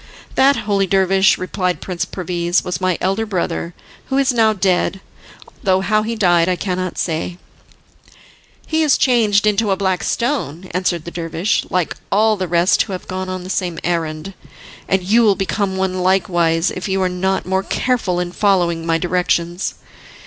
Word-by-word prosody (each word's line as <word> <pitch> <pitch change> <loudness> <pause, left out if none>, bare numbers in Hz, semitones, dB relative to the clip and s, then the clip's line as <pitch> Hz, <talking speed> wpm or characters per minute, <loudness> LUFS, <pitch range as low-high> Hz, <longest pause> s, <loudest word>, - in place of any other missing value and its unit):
"That, 275 +1 +4
holy 200 -2 +1
dervish," 190 0 +3
replied 185 -1 -2
Prince 180 -2 -3
Perviz, 175 -1 -1
"was 180 +1 -4
my 185 -2 +1
elder 195 +4 0
brother, 180 -4 -3 0.3
who 265 - -1
is 275 -2 +2
now 225 -2 +4
dead, 190 -1 0 0.6
though 190 -1 +2
how 215 +2 +2
he 225 +2 -3
died 175 -4 +3
I 180 - +2
cannot 185 -1 -3
say." 165 +1 -2 1.3
"He 320 0 0
is 305 -3 +4
changed 215 -5 +3
into 210 0 +2
a 190 - +1
black 190 -2 0
stone," 235 - -2
answered 175 -2 -1
the 170 - -6
dervish, 170 +3 -1
"like 180 -3 -1 0.2
all 215 +2 +3
the 185 -2 -3
rest 175 +2 +3
who 200 - -3
have 185 - -7
gone 185 0 -4
on 185 -1 -4
the 185 - -6
same 175 -4 -2
errand, 165 +1 -2 0.5
and 190 -1 +1
you 215 +6 +4
will 210 -4 +4
become 195 0 -1
one 185 -1 -1
likewise 175 -2 +2
if 185 - -5
you 195 0 0
are - - +2
not 190 +1 -1
more 190 +1 0
careful 205 -5 -1
in 175 0 -3
following 175 -4 +1
my 165 0 +2
directions." 175 0 -1
185 Hz, 170 wpm, -18 LUFS, 175-200 Hz, 1.3 s, That